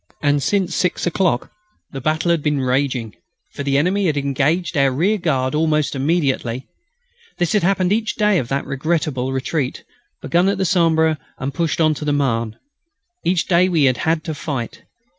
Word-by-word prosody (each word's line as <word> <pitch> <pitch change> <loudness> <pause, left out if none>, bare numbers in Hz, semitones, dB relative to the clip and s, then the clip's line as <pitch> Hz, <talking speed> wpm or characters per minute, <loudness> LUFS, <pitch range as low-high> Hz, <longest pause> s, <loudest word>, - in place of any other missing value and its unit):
And 145 -1 +2
since 185 +4 0
six 180 -1 0
o'clock 175 -7 0 0.4
the 135 - -6
battle 155 +4 +1
had 170 -2 +1
been 150 -1 0
raging, 130 -4 -1 0.4
for - - -7
the 140 -1 +1
enemy 185 +6 +1
had 150 -3 0
engaged 145 +6 0
our 140 -2 +4
rearguard 155 -5 0
almost 155 -1 +1
immediately. 135 -4 0 0.7
This 175 -3 0
had 210 - +3
happened 185 +1 +2
each 220 0 -1
day 210 -3 +3
of 125 - -3
that 135 +3 -2
unforgettable 140 -2 -1
retreat, 135 +1 -2 0.4
begun 175 +3 +2
at 200 - 0
the 190 - 0
Sambre 160 -3 +2 0.2
and 135 +1 -4
pushed 165 +1 -1
beyond 155 -2 +2
the 150 -1 -1
Marne. 115 -6 -1 0.7
Each 175 -1 +1
day 180 0 +3
we 165 -5 +2
had 130 -2 +3
had 160 0 0
to 160 - -4
fight. 140 -6 -5
155 Hz, 170 wpm, -20 LUFS, 135-175 Hz, 0.7 s, our